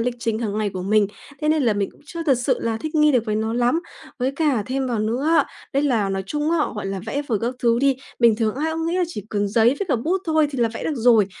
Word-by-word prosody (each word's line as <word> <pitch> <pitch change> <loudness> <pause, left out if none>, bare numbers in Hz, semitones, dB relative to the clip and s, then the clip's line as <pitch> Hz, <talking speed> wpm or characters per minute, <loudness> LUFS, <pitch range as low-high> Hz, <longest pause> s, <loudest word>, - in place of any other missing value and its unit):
lịch 240 +1 0
trình 230 -2 -1
hàng 215 -2 -2
ngày 210 -2 0
của 185 -1 -5
mình. 210 +1 +3 0.3
Thế 305 - 0
nên 310 -2 +3
là 230 - +3
mình 200 -1 -1
cũng - - -23
chưa 335 +1 -5
thật 275 -6 +2
sự 250 0 +1
là 225 -1 -1
thích 310 0 -5
nghi 300 -1 +4
được 245 -3 +2
với 210 - 0
nó 220 +1 -1
lắm. 245 +7 +2 0.4
Với 260 +1 0
cả 285 -9 +1
thêm 265 +1 -1
vào 240 -3 -1
nữa 230 +6 -1
á, - - +4 0.3
đấy 275 0 +1
là 235 -8 +1
nói 195 0 -2
chung 295 +4 -1
á, 335 - +2 0.2
gọi 210 -2 -4
là, 195 -1 -3
vẽ 285 - -2
vời 220 -4 0
các 240 +2 -1
thứ 235 -1 +2
đi, 275 -1 +3 0.2
bình 235 -3 +5
thường 220 -2 0
ai 310 +4 -1
cũng 325 0 -2
nghĩ 340 +2 0
là 365 - +2
chỉ 210 - -7
cần 205 -1 0
giấy 220 +2 +3
với 400 - -2
cả - - +2
bút 340 +11 -1
thôi 315 -2 +3
thì 270 - -5
là 235 -1 +3
vẽ - - -5
được 315 - -1
rồi, 230 -5 +4
240 Hz, 300 wpm, -22 LUFS, 215-295 Hz, 0.4 s, bình